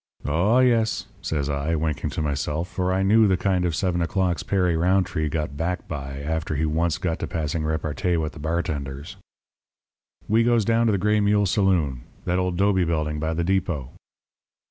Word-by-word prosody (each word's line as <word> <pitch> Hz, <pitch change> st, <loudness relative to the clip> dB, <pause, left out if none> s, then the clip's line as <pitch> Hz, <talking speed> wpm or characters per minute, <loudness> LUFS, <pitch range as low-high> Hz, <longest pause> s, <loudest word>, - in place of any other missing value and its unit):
"'Oh, 85 Hz, -, +2 dB
yes,' 120 Hz, -3 st, +2 dB, 0.2 s
says 70 Hz, -3 st, -2 dB
I, 75 Hz, +3 st, -1 dB
winking 75 Hz, -1 st, -1 dB
to 75 Hz, -, -3 dB
myself, 75 Hz, +3 st, -2 dB
for 90 Hz, 0 st, -1 dB
I 95 Hz, +1 st, +1 dB
knew 110 Hz, +2 st, +5 dB
the 95 Hz, -2 st, +2 dB
kind 90 Hz, -1 st, +1 dB
of 85 Hz, -3 st, 0 dB
seven 90 Hz, +1 st, 0 dB
o'clocks 90 Hz, 0 st, 0 dB
Perry 90 Hz, -4 st, +1 dB
Rountree 85 Hz, -2 st, +1 dB
got 75 Hz, -2 st, -3 dB
back 90 Hz, +4 st, -3 dB
by 70 Hz, -3 st, -5 dB
after 80 Hz, +1 st, -2 dB
he 80 Hz, +2 st, 0 dB
once 80 Hz, +2 st, 0 dB
got 90 Hz, -4 st, -2 dB
to -, -, -3 dB
passing 80 Hz, 0 st, -2 dB
repartee 80 Hz, +3 st, -1 dB
with 80 Hz, -2 st, -2 dB
the 80 Hz, -, -11 dB
bartenders. 75 Hz, -3 st, -3 dB, 1.1 s
"We 110 Hz, +2 st, +3 dB
goes 120 Hz, -3 st, +3 dB
down 115 Hz, +1 st, +3 dB
to -, -, +3 dB
the 100 Hz, -, +2 dB
Gray 105 Hz, +3 st, +2 dB
Mule 105 Hz, 0 st, +3 dB
saloon 90 Hz, -, +1 dB, 0.2 s
that 90 Hz, +1 st, +1 dB
old 90 Hz, -1 st, -1 dB
'dobe 95 Hz, -2 st, +2 dB
building 75 Hz, -2 st, -1 dB
by 80 Hz, +1 st, -1 dB
the 85 Hz, -, 0 dB
depot. 90 Hz, -8 st, -1 dB
85 Hz, 185 wpm, -24 LUFS, 75-95 Hz, 1.1 s, knew